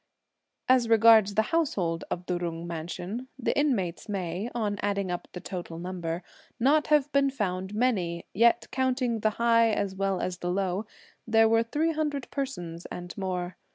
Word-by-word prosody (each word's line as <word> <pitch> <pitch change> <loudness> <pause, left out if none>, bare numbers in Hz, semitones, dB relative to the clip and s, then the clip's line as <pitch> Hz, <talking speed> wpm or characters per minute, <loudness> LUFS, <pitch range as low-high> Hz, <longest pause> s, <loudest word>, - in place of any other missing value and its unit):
As 255 -2 +4
regards 220 -2 +6
the 220 - +4
household 185 - 0
of 180 - -4
the 180 -1 -1
Jung 170 -1 -4
mansion, 175 +8 -5
the 260 - -1
inmates 215 - 0
may, 190 +2 -3
on 210 -3 -1
adding 200 -2 -1
up 175 - -4
the 180 - -5
total 175 -2 -6
number, 175 -1 -4 0.4
not 290 +6 +3
have 295 -1 +3
been 280 -1 +3
found 190 -6 -3
many; 190 -8 0
yet, 235 +3 +4
counting 255 -3 0
the 215 - +2
high 230 -1 +4
as 200 -3 -1
well 195 -1 -1
as 180 -1 -3
the 175 - -3
low, 190 +2 -1 0.4
there 225 0 +5
were 225 0 +4
three 295 +8 0
hundred 300 -4 -2
persons 180 - -4
and 175 0 -7
more. 185 -2 -3
205 Hz, 165 wpm, -28 LUFS, 180-240 Hz, 0.4 s, regards